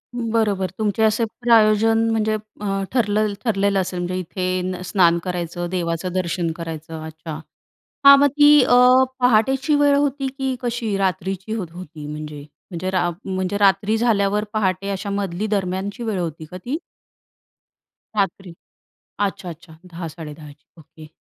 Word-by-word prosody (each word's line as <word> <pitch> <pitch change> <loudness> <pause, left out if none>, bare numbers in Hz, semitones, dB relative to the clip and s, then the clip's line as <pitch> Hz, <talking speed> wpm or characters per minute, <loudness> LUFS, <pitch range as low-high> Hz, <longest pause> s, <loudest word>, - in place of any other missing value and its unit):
बरोबर. 220 -5 0
तुमचे 215 0 0
असे 220 +2 +3 0.2
प्रयोजन 225 -1 +4
म्हणजे 220 -1 +1 0.3
अ, 195 -1 -1
ठरलं 215 -3 +1
ठरलेलं 200 -3 +1
असेल 180 -1 -4
म्हणजे 175 +1 -3
इथे 185 0 -3
स्नान 170 -3 +3
करायचं, 175 -1 -4
देवाचं 170 0 -2
दर्शन 175 -2 -1
करायचं. 160 -1 -7
अच्छा! 160 +1 -9 0.7
हां, 280 0 +10
मग 285 - +5
ती 295 0 +7
अ, 245 - +4 0.4
पहाटेची 255 +5 +3
वेळ 290 -1 +4
होती 280 -1 0
की 265 -1 -1
कशी? 235 -4 -2
रात्रीची 190 +2 -2
होत 205 -6 -3
होती 165 -4 -9
म्हणजे 150 -1 -7 0.3
म्हणजे 180 +2 -3
रा 180 -2 +1 0.2
म्हणजे 190 +1 -2
रात्री 200 +2 +3
झाल्यावर 210 -3 +1
पहाटे 195 -2 0
अशा 200 +1 -3
मधली 200 0 -2
दरम्यानची 200 +2 -2
वेळ 215 -4 -2
होती 160 -2 -4
का 180 +4 -9
ती? 245 - -4 1.4
रात्री, 195 -3 -2 0.6
अच्छा, 200 -2 -2
अच्छा, 160 -1 -12
10-10:30 160 -3 -8
ची. 145 +1 -22
ओके. 155 0 -15
195 Hz, 140 wpm, -21 LUFS, 175-220 Hz, 1.4 s, हां